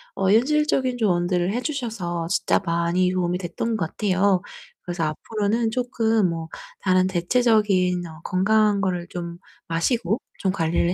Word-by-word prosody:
어 190 0 +1
현실적인 260 +1 +2
조언들을 180 -4 +1
해 245 - -1
주셔서 220 - -3
진짜 - - +2
많이 170 +2 +1
도움이 180 -1 0
됐던 190 +6 -3
것 170 -7 -1
같아요. 195 -2 +2 0.4
그래서 175 -2 -3
앞으로는 215 +8 -1
쪼끔 225 -5 +1
뭐 165 -1 -4 0.3
다른 185 -1 +3
대체적인 190 -2 +2
어 160 0 -12
건강한 205 +2 +2
거를 180 -3 -1
좀 170 -1 -6 0.3
마시고 195 +6 0 0.2
좀 190 - +1
관리를 170 0 +1
185 Hz, 305 characters per minute, -23 LUFS, 175-220 Hz, 0.4 s, 다른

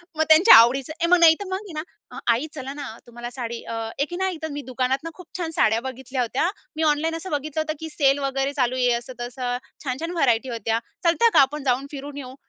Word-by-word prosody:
मग 315 - +2
त्यांच्या 320 +8 +9
आवडीचं, 255 +6 +5
ए - - +3
मग 355 0 +5
नाही 330 -1 +8
तर 405 - -5
मग 375 - -1
आहे 395 -3 -10
ना, 310 +3 -9
"आई 250 +7 -2
चला 270 -1 -6
ना 290 0 -6 0.2
तुम्हाला 240 0 -7
साडी 235 -2 -5
अ, - - -7 0.3
एक 280 - 0
की 350 - -5
नाही 380 -2 -1
तर - - -1
मी 290 0 -5
दुकानातून 260 +5 -1
खूप 365 -1 -14
छान 335 -3 -3
साड्या 220 +1 +3
बघितल्या 260 0 -4
होत्या. 250 +8 0 0.3
मी 320 - -1
ऑनलाईन 315 +2 0
असं 350 +3 -7
बघितलं 300 +1 -2
होतं 310 0 -2
की 320 - -6
सेल 280 -2 +2
वगैरे 275 0 -1
चालू 255 -3 0
आहे. 250 -1 +2
असं-तसं, 245 +1 -4 0.3
छान-छान 285 +5 -3
व्हरायटी 265 -7 +1
होत्या. 225 -1 -1 0.3
चलता 345 +8 +4
का - - +7
आपण 285 +2 0
जाऊन 265 +1 0
फिरून 285 0 -7
येऊ." 260 -2 -8
275 Hz, 225 wpm, -23 LUFS, 250-315 Hz, 0.3 s, त्यांच्या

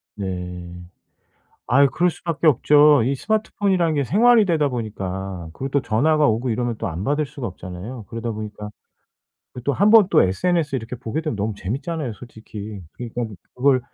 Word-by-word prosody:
네. 90 -3 -5 0.9
아유 140 +3 +5
그럴 180 +1 +3
수밖에 165 -1 -2
없죠. 150 0 +5
이 130 +4 +1
스마트폰이라는 195 -2 0
게 140 - +1
생활이 225 - +5
되다 160 -6 +1
보니까 95 -7 -5
그리고 135 +8 -5
또 140 - +2
전화가 150 +8 +2
오고 115 +2 0
이러면 120 +1 -1
또 - - -3
안 85 +1 -4
받을 145 +5 0
수가 140 -4 -6
없잖아요. 95 +5 -8
그러다 115 +2 -4
보니까 105 -1 -7 0.8
그 125 - -8
또 140 - +1
1 200 +10 +3
번 220 -4 +7
또 - - +5
SNS 150 - 0
이렇게 115 0 -6
보게 125 +5 -3
되면 155 -8 -3
너무 105 +1 -2
재밌잖아요 135 - -3
솔직히. 110 -2 -9
그러니까 120 -2 -5 0.2
그걸 130 0 +3
125 Hz, 365 characters per minute, -22 LUFS, 105-155 Hz, 0.9 s, 번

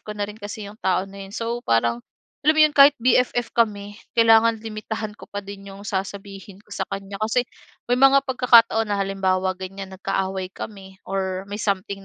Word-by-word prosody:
ko 210 0 -8
na 205 - -1
rin 210 +2 -10
kasi 205 +1 -7
'yong 205 +2 -11
tao 185 0 +1
na 195 0 -10
'yon. 195 - -15
So, 235 +1 -3
parang 115 - +1 0.5
alam 310 - +6
mo 310 - +3
'yon 305 - +5
kahit 280 +1 +9
BFF 245 -1 +2
kami, 205 -2 -1 0.2
kailangan 225 -1 +5
limitahan 215 0 -5
ko - - -12
pa 205 0 -6
din 200 0 -10
'yong 195 +1 -10
sasabihin 195 0 -6
ko 205 - -28
sa - - -3
kaniya, 195 0 -6
kasi 220 +3 +1 0.5
may 245 - +3
mga 270 +1 +6
pagkakataon 235 -4 +4
na 205 - -1
halimbawa 190 -1 0
ganiyan 190 +1 -7
nagkaaway 190 0 -3
kami 195 -3 -9
or 190 -1 -3
may 205 - -4
something 200 -1 -2
205 Hz, 190 wpm, -23 LUFS, 195-225 Hz, 0.5 s, kahit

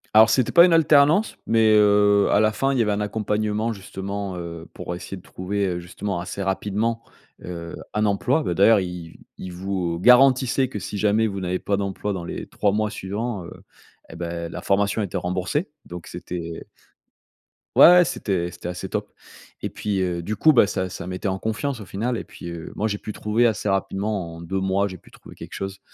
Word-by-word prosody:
Alors, 110 +1 +8
c'était 130 -4 +2
pas 170 - +8
une 180 - +3
alternance, 155 +5 +4
mais, 110 -1 +4
heu, 105 -1 +4
à 100 - +4
la 110 0 +3
fin, 135 +5 0
il 130 - 0
y - - +5
avait 105 -2 +1
un 100 - -1
accompagnement, 105 +1 -1
justement, 100 -1 -5
heu, 85 -1 -7
pour 90 - -5
essayer 95 +1 -7
de - - -12
trouver, 100 +2 -3
heu, 90 -1 -2
justement, 90 +2 -4
assez 90 +3 -5
rapidement, 105 +4 -1 0.4
heu, 85 -1 -6 0.2
un 105 0 +1
emploi. 125 +9 +1
Bah, 90 - -2
d'ailleurs, 105 +3 +6
i 90 -3 -6 0.2
ils 95 - -7
vous, 90 -2 -2
heu, - - -7
garantissaient 130 +2 +5
que 105 - -6
si 105 - -5
jamais 105 +2 +2
vous 100 -2 -4
n'avez 90 0 -1
pas 100 - -1
d'emploi 100 +1 -3
dans 90 -3 -5
les - - -6
3 100 - 0
mois 105 +1 0
suivants, 105 0 -4
heu, - - -10 0.6
eh - - -10
beh, 85 0 -4
la - - -7
formation 100 +2 +1
était 95 - -6
remboursée. 90 - -2 0.2
Donc 90 -1 -9
c'était 85 -2 -6 1.1
Ouais, - - +9
ouais! 180 +1 +8
C'était 90 - -2
c'était 85 - -8
assez 90 0 -5
top. - - -4 0.5
Et - - -3
puis, 100 -2 -2
heu, 90 -2 -2
du 105 +5 -3
coup, 155 +8 +5
bah, 120 - +6
ça 95 -2 -2
ça 85 - -7
mettait 90 +2 -4
en 95 0 -1
confiance, 115 +6 -3
au 105 - -8
final 115 +7 -2
et - - -5
puis, - - -11
heu, 85 -1 -7
moi, 110 - 0
j'ai 105 -1 -2
pu 105 - -7
trouver 110 +4 +1
assez 105 -2 0
rapidement, 95 -2 -2
en - - -10
2 95 +3 -3
mois, 95 +1 +1
j'ai 95 - -8
pu - - -21
trouver - - -14
quelque - - -10
chose, 95 0 -5
100 Hz, 215 wpm, -23 LUFS, 90-110 Hz, 1.1 s, Ouais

